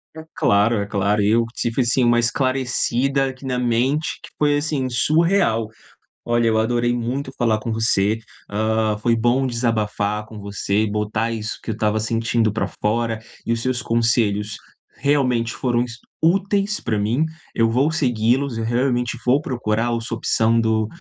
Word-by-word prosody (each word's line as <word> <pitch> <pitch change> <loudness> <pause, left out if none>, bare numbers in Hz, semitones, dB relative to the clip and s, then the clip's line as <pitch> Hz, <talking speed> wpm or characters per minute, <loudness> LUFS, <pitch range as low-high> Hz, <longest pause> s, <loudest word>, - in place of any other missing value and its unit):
É 160 - -8
claro, 105 +3 +3
é 100 - -1
claro. 100 +1 +1
Eu 115 +3 +3
tive, 120 +3 -1
assim, 125 +2 +2
uma 120 0 +4
esclarecida 130 +1 0
aqui 130 +1 -11
na 125 -1 -1
mente, 125 +6 0
que - - -11
foi, 145 -1 +2
assim, 145 -3 -1
surreal. 150 - +2 0.6
Olha, 120 -1 +1
eu 110 0 +2
adorei 120 +2 +1
muito 130 +3 -3
falar 110 -3 +2
com 115 +1 -4
você, 110 -1 +1 0.3
hã, 110 0 0
foi 115 +1 +1
bom 120 +4 +2
desabafar 105 -3 -1
com 110 -1 -11
você 100 0 -2
e 110 - -1
botar 105 +2 -1
isso 110 -2 -4
que - - -5
eu 105 - -3
tava 110 0 +1
sentindo 115 0 0
pra 115 - -1
fora. 115 +1 0 0.3
E 115 - +1
os 115 - -4
seus 130 -2 -1
conselhos 115 -3 +1 0.4
realmente 125 -5 +1
foram 120 -2 0
es 120 -1 -6 0.2
úteis 195 +4 +2
pra 110 -3 -1
mim, 115 +9 +1 0.3
eu 115 0 +2
vou 135 +6 +2
seguí-los. 125 -2 +1
Eu 115 - -2
realmente 125 +1 0
vou 130 +3 +3
procurar 120 -4 -1
o 115 - -1
sua 115 0 -4
opção 115 0 +2
do 110 -1 +1
115 Hz, 170 wpm, -21 LUFS, 110-130 Hz, 0.6 s, uma